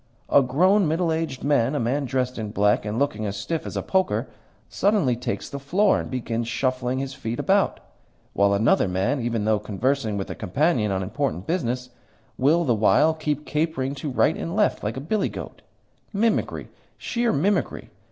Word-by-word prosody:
A 140 - +6
grown, 180 +9 +3
middle 165 +2 +1
aged 160 -5 -3
man 140 -2 +2
a - - 0
man 135 +5 0
dressed 125 -1 -2
in 110 -1 -4
black, 105 0 +2
and 105 +1 -3
looking 120 -6 0
as 100 0 -4
stiff 160 +11 -3
as - - -5
a - - -2
poker 190 -1 0 0.4
suddenly 195 - +2
takes 120 0 -4
the 140 - -6
floor 190 +9 +2
and - - -5
begins 120 -2 -3
shuffling 130 +1 -1
his 135 0 -3
feet 120 -3 -5
about, 195 0 +2 0.5
while 100 0 +3
another 105 0 +3
man, 95 +10 0
even 115 -3 -1
though 110 -1 +2
conversing 110 +2 -1
with 95 - -4
a - - -2
companion 110 - 0
on 95 0 -1
important 110 -2 -2
business, 125 -7 -2 0.4
will, 155 +6 +3
the 130 -7 +2
while, 130 +9 +4
keep 150 -2 -3
capering 150 -3 -1
to 145 +1 -5
right 140 +4 +2
and 165 - -4
left 210 -1 +1
like 105 +3 -3
a - - -2
billy 195 +7 0
goat! - - -8 0.5
Mimicry, 220 +2 0 0.3
sheer 240 -1 0
mimicry! 195 +6 0
135 Hz, 180 wpm, -24 LUFS, 115-160 Hz, 0.5 s, A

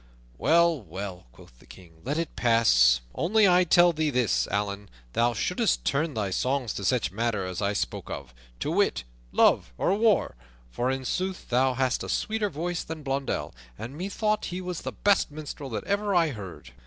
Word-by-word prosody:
"Well, 170 -2 +3
well," 95 -7 -7
quoth - - -18
the - - -20
King, 80 -3 -16
"let 145 +4 -2
it 165 -1 -3
pass; 65 - +4
only 205 +5 +3
I 180 0 +5
tell 175 0 +5
thee 155 -1 0
this, 115 - +1
Allan, 100 0 -3 0.2
thou 120 0 +2
shouldst 190 - 0
turn 145 +2 0
thy 100 -3 -1
songs 125 +3 -1
to 100 - -5
such 120 +1 +1
matters 100 -4 -2
as - - -2
I 100 0 0
spoke 65 -11 -3
of, 65 -3 -7 0.3
to - - -1
wit, - - +1 0.3
love - - +3
or 185 - +1
war; 215 -2 +2 0.4
for 120 - -1
in 130 0 -2
sooth 185 +6 -3
thou 130 +1 +2
hast 130 0 0
a - - -6
sweeter 215 -1 -1
voice 175 +2 -3
than 160 -1 -7
Blondell, 135 0 -2 0.2
and 125 +5 -7
methought 200 +5 -1
he 180 - -4
was 180 -2 -5
the - - -4
best 200 -2 +2
minstrel 145 -2 -7
that 115 - -4
ever 200 0 0
I 165 -2 +4
heard." 100 - -9
135 Hz, 185 wpm, -27 LUFS, -, 0.4 s, I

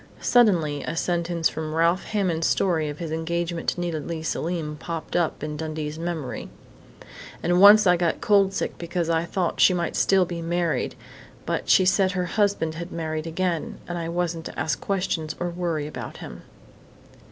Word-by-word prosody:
Suddenly 170 - +3
a 165 - -4
sentence 170 -1 0
from 155 0 -5
Ralph 170 +3 +2
Hammond's 185 -6 0
story 160 -5 +1
of 145 - -6
his 165 -2 -5
engagement 170 +1 -2
to - - -4
Nita 170 -3 -2
Leigh 160 +1 -5
Selim 160 -2 -2
popped 165 +1 -6
up 170 -4 0
in 150 0 -3
Dundee's 155 0 -4
memory: 160 -9 -4 0.9
"And 175 +2 +3
once 210 +1 +9
I 180 -1 +5
got 170 -1 0
cold 200 -2 +4
sick 195 - -3
because 170 -1 -2
I 165 0 +1
thought 175 -1 -2
she 185 - +6
might 170 -1 -2
still 190 -2 +3
be 170 -1 -5
married, 170 0 -1 0.5
but - - -2
she 190 - +6
said 190 0 +3
her 180 -1 -1
husband 200 -4 0
had 170 +2 -7
married 155 -1 -3
again, 170 0 -2
and 175 - -4
I 165 -1 -3
wasn't 170 -1 -2
to - - -7
ask 140 -4 -1
questions 180 -5 -2
or 175 0 -2
worry 170 -4 -2
about 150 - -7
him." - - -9
170 Hz, 175 wpm, -24 LUFS, 160-180 Hz, 0.9 s, once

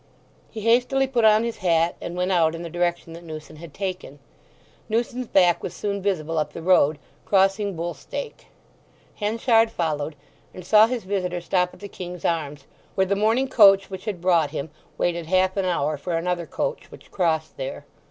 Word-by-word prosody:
He 220 - -7
hastily 245 +4 +3
put 245 -4 +1
on 215 +1 +5
his 235 -1 -3
hat, 170 -2 +1
and 175 - -5
went 180 +1 -1
out 165 -3 +3
in 165 - -7
the 170 - -7
direction 175 -1 -2
that 170 +1 -10
Newson 155 -1 -9
had 165 0 -11
taken. 185 -5 -5 0.7
Newson's 240 +2 -1
back 180 -4 +3
was - - -6
soon 200 -1 -3
visible 165 -5 -1
up 150 -1 -2
the - - -7
road, 160 -4 +4 0.3
crossing 195 0 +2
Bull 170 +1 -3
stake. - - -8 0.7
Henchard 225 +1 +2
followed, 155 -6 -2 0.4
and 185 - -9
saw 215 +3 +6
his 245 -1 -3
visitor 185 -2 -2
stop 180 +1 0
at - - -20
the 200 - -6
King's 180 -2 -8
Arms, 150 -4 -2 0.3
where 190 - +3
the 200 +1 0
morning 225 +6 +2
coach 195 -5 +5
which 190 0 -7
had 200 -6 -4
brought 170 -4 +3
him 145 +2 -5 0.3
waited 170 -2 -1
half 185 +1 +2
an 195 -2 0
hour 155 -4 0
for 165 +4 -2
another 175 0 -2
coach - - -3
which - - -15
crossed 160 -4 -1
there. 135 0 -6
180 Hz, 185 wpm, -24 LUFS, 165-205 Hz, 0.7 s, saw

